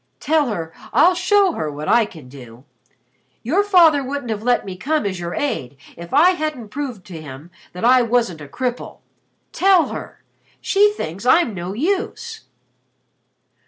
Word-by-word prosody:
Tell 305 -2 +1
her 165 -8 -4 0.2
I'll 360 +2 +5
show 380 +1 +3
her 155 - -4
what 150 +1 -7
I 235 -2 +3
can 160 -10 -13
do. 125 -2 -13 0.8
Your 330 - +1
father 335 -8 +5
wouldn't 270 -2 -4
have 210 -1 -3
let 245 +2 +1
me 190 -2 -6
come 300 +9 -1
as 190 -3 -3
your 170 0 -5
aide 140 - -3 0.2
if 170 0 -10
I 350 +5 +5
hadn't 310 - -4
proved 250 -6 -6
to 170 -6 -9
him 145 +3 -11 0.2
that 180 +6 -4
I 255 +1 +6
wasn't 230 -9 0
a 145 - -9
cripple. 245 - -5 0.5
Tell 375 -3 +3
her. - - -9 0.4
She 410 +1 +3
thinks 185 - -6
I'm 260 -4 +4
no 180 0 -5
use." 400 - -3
245 Hz, 160 wpm, -20 LUFS, -, 0.8 s, I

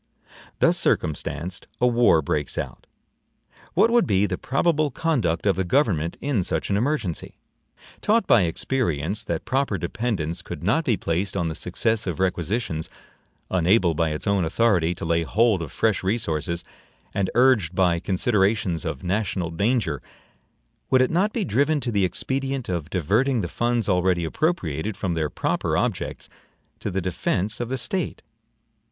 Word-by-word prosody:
Thus - - +3
circumstanced, 85 +3 -1
a 125 - +3
war 120 -10 +4
breaks 75 0 -2
out. - - -5 0.9
What 230 - +4
would 240 -1 +4
be 100 -1 +3
the - - -1
probable 155 +2 +1
conduct 120 - 0
of 100 -3 +3
the 95 - +1
government 90 - +1
in 140 -8 0
such 80 +1 -2
an - - +3
emergency? 115 - -2 0.6
Taught 220 0 +3
by 120 - +5
experience 90 - -1
that 85 -6 -3
proper 135 -6 0
dependence 85 -4 -2
could 85 -3 -8
not 145 - +2
be 115 -5 +2
placed 95 +4 -1
on 85 -3 0
the - - -3
success 110 +6 -1
of 85 -1 -3
requisitions, 90 -2 -1 0.6
unable 90 0 +3
by 80 0 +1
its 75 0 -4
own 100 -2 +2
authority 90 -1 +2
to - - -6
lay 85 0 +2
hold 105 +3 +2
of 80 - -6
fresh 110 -3 +1
resources, 85 -5 -1 0.5
and 95 -2 0
urged 120 -9 +4
by 90 -2 +3
considerations 95 - +1
of 65 - -4
national 95 -2 -1
danger, 95 - 0 0.9
would 130 -1 +5
it 130 - 0
not 190 +6 +2
be 215 -4 -1
driven 145 +5 +2
to 125 -2 -3
the 100 -3 +2
expedient 135 +5 -2
of 85 -4 -3
diverting 110 - +1
the 90 - -2
funds 120 +4 0
already 90 -2 +2
appropriated 95 - -1
from 95 -4 -1
their 80 -2 -1
proper - - -1
objects - - -2 0.5
to - - -3
the 95 0 -1
defense 95 +3 -1
of 120 -1 -3
the 130 - -1
State? 155 +8 -3
100 Hz, 160 wpm, -24 LUFS, 85-120 Hz, 0.9 s, by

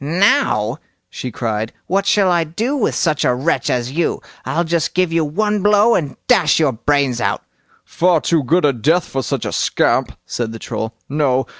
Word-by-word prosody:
"Now", 140 - +1 0.3
she 130 - -5
cried, 110 -1 -3
"what 195 +2 0
shall 195 -3 +3
I 170 -1 +2
do 215 - -2
with 255 - 0
such 155 -4 0
a 125 - +2
wretch 140 +7 -1
as 125 0 -1
you? 165 +3 -1 0.3
I'll 155 +6 0
just 165 -1 -1
give 180 -2 +1
you 165 -1 +2
one 210 +7 -1
blow, 210 +3 +4
and 145 -9 -2
dash 195 -13 +3
your 155 -4 +3
brains 130 +1 0
out!" 100 -2 -1 0.4
"Far 175 -1 +2
too 160 -1 +1
good 165 +6 +2
a 140 - +3
death 160 +9 +1
for 135 - -3
such - - -3
a - - -3
scamp", - - 0
said 115 -2 -4
the - - -6
Troll. 110 +1 -5
"No! 135 -3 +1
155 Hz, 190 wpm, -18 LUFS, 125-180 Hz, 0.4 s, blow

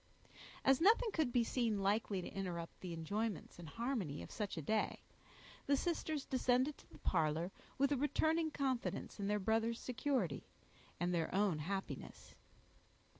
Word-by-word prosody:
As 270 +1 +5
nothing 440 +4 +5
could 310 -9 +1
be 240 -1 +4
seen 230 -2 +1
likely 200 -1 +1
to - - -5
interrupt 175 -4 -4
the 180 - -5
enjoyments 190 +5 -3
and 165 -2 -8
harmony 230 - -2
of - - -10
such 205 -4 -3
a - - -1
day, 215 +7 0 0.6
the 280 - +4
sisters 315 -2 -1
descended 255 +2 +2
to - - -18
the - - -12
parlor, 165 +1 +1 0.3
with 275 +1 +3
a 285 - +3
returning 315 +3 +2
confidence 265 -7 -2
in 200 - -1
their 210 0 +2
brother's 225 +3 +1
security, 250 - -1 0.5
and 175 +1 +1
their 165 -2 0
own 195 -6 +3
happiness. 190 +5 -5
220 Hz, 155 wpm, -38 LUFS, 180-270 Hz, 0.6 s, As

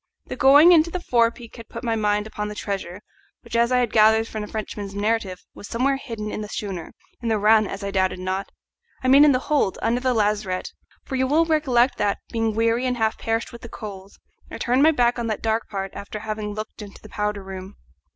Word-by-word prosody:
The - - -6
going 290 +6 +7
into 335 -1 +5
the 365 - -3
forepeak 235 -5 0
had 230 - -11
put - - -8
my 230 -2 0
mind 210 -1 0
upon 210 -1 -5
the 210 - -6
treasure, 195 -2 -5 0.4
which, - - -8
as 235 +1 +3
I 250 - +4
had 245 -3 +1
gathered 220 0 +5
from 220 - -5
the 210 - -5
Frenchman's 205 -2 -6
narrative, 205 -3 -1
was 205 - -10
somewhere 270 +4 0
hidden 225 -5 -6
in - - -4
the 210 - -6
schooner 195 -6 -5 0.3
in 235 - -2
the 220 - +2
run, 215 0 +4
as 195 +1 -6
I 200 - -3
doubted 190 -1 +1
not; 185 +2 -3 0.5
I - - 0
mean 275 +3 +7
in 300 - +7
the 255 - +3
hold, 265 -6 0
under 235 +2 +1
the 255 -1 +1
lazarette, 205 -3 0 0.3
for 265 - -5
you 260 0 +1
will 315 +4 +3
recollect 270 -6 +2
that, 205 -1 +1
being 225 -2 -1
weary 230 +3 +1
and 250 -1 -1
half 220 -1 0
perished 225 +1 -2
with 235 - -11
the 235 - -9
cold, 195 -3 -9 0.4
I - - -8
had - - -8
turned 250 +3 +2
my 310 - +7
back 245 -5 +2
on 235 - -2
that 215 -2 -3
dark 225 0 -1
part 195 -2 -4
after 205 +1 -7
having 215 -1 -4
looked 215 +1 -7
into 200 -1 -10
the - - -13
powder 210 -1 -2
room. 190 0 -8
220 Hz, 235 wpm, -23 LUFS, 205-245 Hz, 0.5 s, going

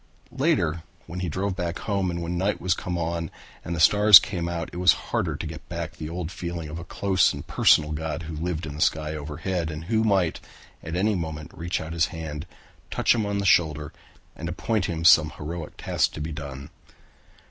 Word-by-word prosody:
Later 95 - +1 0.2
when 90 +2 -6
he 90 -1 -2
drove 95 +4 -2
back 85 -2 -3
home 100 -3 -1
and 85 -1 -3
when 85 +1 -3
night 95 +4 0 0.2
came 90 -3 -4
on 85 -1 -2 0.3
and 85 - -3
the - - -4
stars 105 +4 +9
came 85 -1 -1
out 85 -2 -4
it - - -6
was 90 +1 +6 0.2
harder - - 0
to - - -5
get - - -8
back - - -4
the 75 - -6
old 85 0 -4
feeling 85 -3 -5
of 80 +2 -6
a - - -7
close 95 +1 +2
and - - -7
personal 75 0 +4
God 80 +2 -3
who 80 0 -6
lived 85 +1 -3
in 75 - -6
the 75 - -6
sky 75 0 +1
overhead 80 +3 -3
and 80 0 -6
who 110 +5 +1
might 95 -6 +2 0.4
at 80 0 -5
any 105 +4 +2
moment 80 -4 -4
reach 85 +1 -3
out 80 +1 -6
his 85 -1 +2
hand, 80 -1 -6 0.4
touch - - +3
him 110 -3 -1
on 100 0 -1
the 100 - -1
shoulder, 80 -4 +2 0.4
and 85 +2 -5
appoint 100 +3 -1
for - - -2
him 80 0 -4
some 80 -2 +7
heroic 80 +1 -6
task - - 0
to - - -7
be 75 +2 -4
done. 70 -3 -7
85 Hz, 215 wpm, -25 LUFS, 80-90 Hz, 0.4 s, stars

